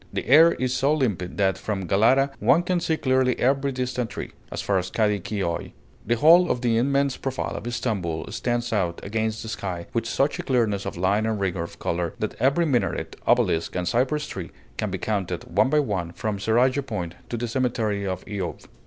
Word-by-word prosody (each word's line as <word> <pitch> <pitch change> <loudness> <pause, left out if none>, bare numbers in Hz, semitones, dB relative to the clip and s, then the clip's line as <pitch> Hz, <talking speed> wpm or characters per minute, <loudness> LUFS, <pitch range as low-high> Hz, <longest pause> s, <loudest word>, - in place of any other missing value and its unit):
The - - -3
air 160 +5 +7
is 130 -1 -1
so 140 +4 +2
limpid 105 - -1
that 95 -2 +1
from 100 -3 -3
Galata 125 +9 +3
one 165 +6 +4
can 180 0 0
see 165 -2 0
clearly 130 -2 +2
every 135 +2 +1
distant 125 -2 -2
tree, - - -6 0.2
as - - -4
far 100 -2 +1
as 90 0 -4
Kadi 105 0 +1
Kioi. 95 -3 -3 0.3
The 120 - +3
whole 170 +8 +6
of 120 - 0
the 120 -2 +2
immense 140 +2 +1
profile 135 -1 -3
of 120 - -4
Stamboul 95 -10 -2
stands 120 +1 -1
out 90 -5 0
against 110 +2 -2
the 110 - -6
sky 95 -6 -4
with 115 -1 -1
such 140 +5 0
a - - 0
clearness 110 -6 0
of - - -5
line 100 +5 +1
and 110 -2 -1
rigor 95 -3 -1
of 85 - -7
color, 85 -1 -2
that 110 - -3
every 140 +6 +3
minaret, 130 -6 -1
obelisk, 80 - +2
and 90 -1 -1
cypress 135 - +1
tree 90 -3 -6 0.3
can - - -2
be - - -3
counted, 95 -5 -2
one 100 +9 +2
by 150 +2 +3
one, 95 - -2
from 105 +1 -3
Seraglio 125 +6 +2
Point 105 -10 -4 0.2
to 120 - -3
the 120 +1 -2
cemetery 115 -5 -1
of 95 -1 -4
Eyub. 95 -4 -5
110 Hz, 205 wpm, -24 LUFS, 95-130 Hz, 0.3 s, air